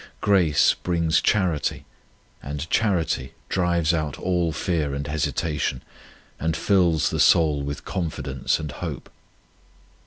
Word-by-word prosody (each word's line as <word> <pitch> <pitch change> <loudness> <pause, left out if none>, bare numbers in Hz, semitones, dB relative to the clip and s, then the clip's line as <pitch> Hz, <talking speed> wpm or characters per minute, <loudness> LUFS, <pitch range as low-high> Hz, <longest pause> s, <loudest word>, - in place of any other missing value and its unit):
Grace 85 -7 +4
brings 85 -2 0
charity, 90 -8 0 0.6
and 75 +2 -5
charity 95 -7 0 0.2
drives 85 -2 +1
out 75 -3 -2
all 90 -3 0
fear 80 -5 -1
and 70 +1 -4
hesitation, 75 -2 -2 0.6
and 80 0 -1
fills 90 -6 +2
the - - -2
soul 75 -4 +4
with 70 0 -5
confidence 70 -6 -2
and 75 -2 -5
hope. - - -6
80 Hz, 115 wpm, -24 LUFS, 75-90 Hz, 0.6 s, Grace